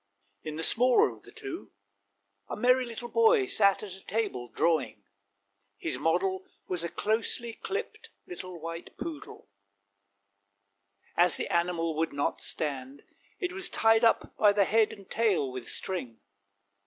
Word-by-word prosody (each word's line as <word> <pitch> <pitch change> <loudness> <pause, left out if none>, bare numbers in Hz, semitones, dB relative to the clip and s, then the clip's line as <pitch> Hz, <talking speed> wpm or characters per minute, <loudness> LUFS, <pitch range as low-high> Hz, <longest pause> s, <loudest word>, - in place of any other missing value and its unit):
In 155 - -6
the 160 - -2
smaller 245 +7 +4
of - - -14
the - - -15
two 400 -5 -8 0.8
a - - -4
merry 250 +1 +4
little 235 0 -6
boy 450 - +4
sat 200 - +3
at 200 -3 -6
a 190 - -11
table 200 - -2
drawing; 160 -11 0 0.7
his 125 - -3
model 185 +5 0 0.2
was 180 -2 0
a 170 - -2
closely 225 +3 -1
clipped, 405 - -5 0.2
little 185 - -7
white 165 +1 -7
poodle; 315 - -7 1.7
as 175 -2 +4
the - - -3
animal 170 -2 +1
would 165 -1 0
not 140 0 -1
stand, 140 -2 -3 0.4
it 360 -2 -2
was 370 -1 -1
tied 225 -4 +4
up 230 - +3
by 210 -1 +6
the 200 -1 +3
head 220 +1 +3
and 200 -2 -12
tail 195 - +1
with 125 -2 -6
string. 130 - -4
195 Hz, 145 wpm, -29 LUFS, 165-240 Hz, 1.7 s, by